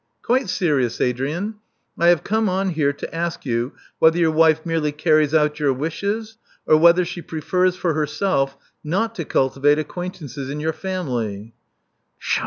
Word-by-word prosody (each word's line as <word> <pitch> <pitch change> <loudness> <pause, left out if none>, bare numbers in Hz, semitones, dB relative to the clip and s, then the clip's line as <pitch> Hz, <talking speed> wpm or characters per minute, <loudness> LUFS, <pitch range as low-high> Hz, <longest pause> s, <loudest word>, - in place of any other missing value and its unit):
"Quite 250 -3 +1
serious, 140 -11 0
Adrian. 150 - -1 0.4
I 170 - +2
have 175 -3 +4
come 220 0 +1
on 190 +1 0
here 150 -4 +1
to 140 - -8
ask 170 -1 -3
you 120 +1 -1 0.3
whether 160 +1 +5
your 165 -2 +3
wife 160 0 +3
merely 165 -3 0
carries 155 -1 +2
out 150 -1 +2
your 145 -2 +2
wishes, 205 - -3 0.3
or 155 - +5
whether 170 +3 +5
she 175 - -6
prefers 180 +3 0
for 175 -3 -1
herself 150 -3 0 0.3
not 195 +9 -1
to 170 -8 -5
cultivate 135 +2 +2
acquaintances 150 -4 -5
in 145 +2 -4
your 160 +1 -1
family." 120 - -4
160 Hz, 155 wpm, -21 LUFS, 145-180 Hz, 0.4 s, whether